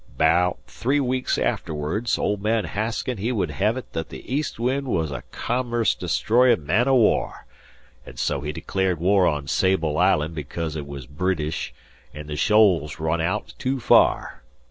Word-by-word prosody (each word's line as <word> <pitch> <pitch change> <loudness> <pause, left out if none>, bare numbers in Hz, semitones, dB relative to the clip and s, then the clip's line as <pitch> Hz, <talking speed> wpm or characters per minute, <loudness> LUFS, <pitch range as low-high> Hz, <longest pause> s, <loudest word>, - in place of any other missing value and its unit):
'Baout 85 +4 +3
three 120 - -1
weeks 130 -1 0
afterwards, 80 +10 -1
old 105 -1 -1
man 110 -1 +1
Hasken 110 +5 -3
he 115 +5 -1
would 110 -6 -1
hev 105 +5 0
it 130 - -9
that 80 -1 -4
the - - -10
"East 145 -4 -2
Wind" 130 +3 -1
was 80 - -1
a 65 -3 -5
commerce 120 -1 0
destroyin' 120 - +2
man 105 - +2
o' 135 - +4
war, 115 -4 +1 0.6
an' - - -13
so 70 -2 -1
he 75 0 -3
declared 90 +2 -1
war 95 +1 +3
on 75 -3 -1
Sable 85 -3 +1
Island 75 +2 +2
because 80 +1 -5
it 75 -2 -5
was 70 -3 -8
Bridish, 80 +2 -2 0.4
an' 75 0 -7
the 75 0 -5
shoals 90 -7 +3
run 80 +1 0
aout 85 +3 -2
too 130 +1 -1
far. 115 - +3
95 Hz, 165 wpm, -23 LUFS, 75-115 Hz, 0.6 s, o